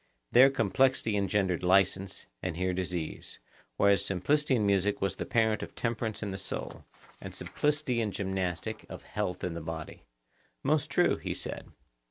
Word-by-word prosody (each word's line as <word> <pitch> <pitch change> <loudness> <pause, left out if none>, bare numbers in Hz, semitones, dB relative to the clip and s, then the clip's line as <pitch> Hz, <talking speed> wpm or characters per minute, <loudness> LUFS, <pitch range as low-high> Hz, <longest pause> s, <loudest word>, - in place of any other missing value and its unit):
There 130 +3 +8
complexity 120 -1 +2
engendered 100 -3 +1
licence, 95 +1 +2 0.2
and 85 -3 -3
here 90 0 0
disease; 90 -3 -4 0.4
whereas 100 -1 +4
simplicity 140 +10 +2
in 110 -4 +1
music 100 0 +2
was 95 - 0
the - - -4
parent 110 -3 +2
of - - -7
temperance 115 -2 -2
in 100 - -3
the 95 - -4
soul; 95 - -6 0.4
and - - -7
simplicity 150 -5 0
in 110 -2 -1
gymnastic 95 +2 -2
of - - -8
health 90 - -3
in 90 - -1
the 85 - -5
body. 80 0 -6 0.6
Most 150 +2 +2
true, 175 - +3
he - - -4
said. - - -6
100 Hz, 160 wpm, -30 LUFS, 90-115 Hz, 0.6 s, There